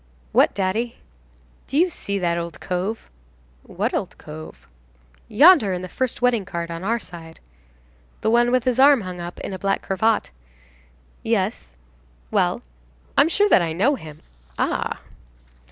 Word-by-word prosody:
"What, - - +3
daddy?" 205 +5 -1 0.7
"Do 270 - -2
you 350 +3 +3
see 200 -9 -3
that 175 -3 0
old 170 -1 -5
cove?" 190 +5 -3 0.5
"What - - -3
old - - -3
cove?" 80 0 -11 0.6
"Yonder, 280 - +6
in 180 0 -4
the - - -5
first 250 +6 -3
wedding 240 -4 +3
cart, 170 -2 -5
on 165 +1 -6
our 230 +4 0
side." 165 -5 -11 0.8
"The 220 - +1
one 240 +1 +4
with 255 -1 +2
his 255 -1 0
arm 275 -2 +6
hung 180 -2 -7
up 175 0 -7
in - - -5
a 190 - -6
black 195 0 -1
cravat?" 215 +3 0 0.9
"Yes." - - -2 0.6
"Well?" - - +1 0.5
"I'm 315 - +5
sure 410 +4 +3
that - - +6
I 165 -2 -1
know 205 - +2
him." 155 - -9 0.3
"Ah!" - - -1
195 Hz, 155 wpm, -22 LUFS, 170-245 Hz, 0.9 s, Yonder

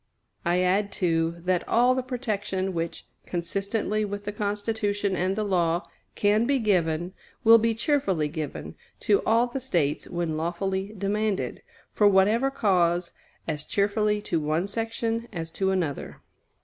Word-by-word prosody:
I 175 +1 +2
add, 200 +3 +2
too, 165 -2 0
that 180 -1 +1
all 245 +2 +4
the 260 - 0
protection 210 -7 -2
which, 165 -1 -4 0.2
consistently 200 +5 -1
with 205 0 -4
the 205 - -3
Constitution 205 -1 -1
and 185 +2 0
the 215 - -1
law, 175 -3 +1 0.3
can 210 +3 +3
be 280 0 +3
given, 175 -6 +1 0.3
will 230 0 +8
be 225 0 +1
cheerfully 215 - +1
given 150 -1 -5 0.3
to 405 - +3
all 230 +2 +4
the 245 +2 -4
States 170 - -1
when 170 -3 -2
lawfully 190 +5 -2
demanded, 205 +1 -1 0.3
for 210 - +4
whatever 210 +7 +4
cause, 180 -8 +1 0.4
as 155 -2 -2
cheerfully 210 +2 +1
to 165 - 0
one 155 +4 0
section 225 +2 -2
as 165 -4 -5
to 190 +2 0
another. 175 -7 -2
200 Hz, 145 wpm, -26 LUFS, 175-220 Hz, 0.4 s, will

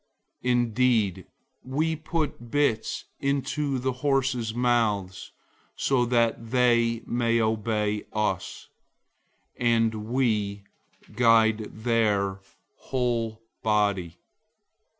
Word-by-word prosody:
003:003 125 - +2
Indeed, 115 -5 +1 0.4
we 155 +5 -1
put 155 -6 -3
bits 140 -5 0
into 140 0 -1
the 130 +1 -1
horses' 130 -3 0
mouths 110 -6 0 0.4
so 130 -3 +1
that 115 -1 +1
they 115 -2 +2
may 115 -1 +1
obey 110 -1 0
us, 95 -3 -2 0.9
and 115 -2 +2 0.2
we 105 -6 0 0.5
guide 110 -2 +3
their 105 -5 +1 0.4
whole 115 -3 -2 0.2
body. 100 -5 0
115 Hz, 85 wpm, -26 LUFS, 105-125 Hz, 0.9 s, guide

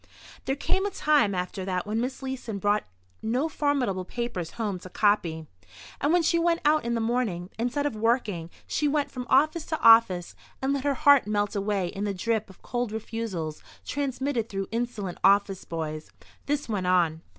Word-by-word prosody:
There 270 - 0
came 380 +6 0
a - - -1
time 295 - +2
after 180 +1 -3
that 185 -1 -2
when 215 +2 -1
Miss 260 +2 -4
Leeson 255 -5 -4
brought 205 +2 +1 0.4
no 245 +8 0
formidable 275 -12 0
papers 190 -5 -4
home 205 -5 -2
to 185 - -10
copy. 175 -6 +1 0.6
And 290 - +2
when 350 0 +4
she 335 +1 +3
went 335 0 +2
out 305 +1 +4
in 235 0 -1
the - - 0
morning, 225 -6 -1
instead 245 +5 0
of 290 - -1
working, 215 -7 0 0.2
she 300 - 0
went 290 0 0
from 250 -1 -6
office 310 +5 +3
to 315 - -2
office 225 -6 +6 0.3
and 270 +1 0
let 280 0 -2
her 285 -1 +2
heart 285 -3 +5
melt 205 0 0
away 200 -3 0
in 195 - -5
the 200 -1 -2
drip 220 +2 -1
of 190 - -17
cold 245 -3 -2
refusals 215 -8 -4 0.2
transmitted 265 -3 -2
through 195 -1 -4
insolent 225 -6 -3
office 200 -1 +3
boys. 155 -2 -5 0.4
This 290 0 -1
went 200 -5 -2
on. 170 -3 +2
225 Hz, 185 wpm, -27 LUFS, 190-270 Hz, 0.6 s, office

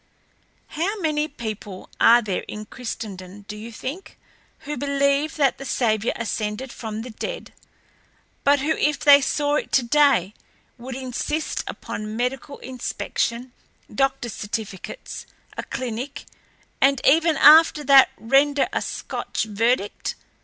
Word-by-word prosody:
"How 385 +7 -2
many 305 -3 0
people 215 -8 -7
are 235 +1 +6
there 195 -4 -2
in 210 0 -7
Christendom, 205 -5 -7
do 210 +1 -8
you 220 +2 -8
think, 275 - -7 0.4
who 295 - -5
believe 280 +1 +1
that 280 -4 +2
the - - -6
Saviour 225 -4 0
ascended 225 +2 -3
from 220 -1 -6
the 250 - -8
dead, - - -6 0.9
but 285 0 +4
who 300 +3 0
if 300 -1 +1
they 285 -1 +7
saw 290 +1 +1
it - - -4
today 255 -6 +3 0.5
would 250 +1 -7
insist 265 +4 -3
upon 215 +1 -6
medical 265 +3 -3
inspection, 250 -1 -3 0.4
doctor's 270 -4 0
certificates, 215 - -6 0.3
a - - -3
clinic, 255 +3 -5 0.6
and 275 -1 +4
even 320 +3 +4
after 315 -1 +7
that 275 -2 +7
render 275 +4 +3
a - - 0
Scotch - - -4
verdict? 220 0 -1
260 Hz, 125 wpm, -23 LUFS, 220-285 Hz, 0.9 s, they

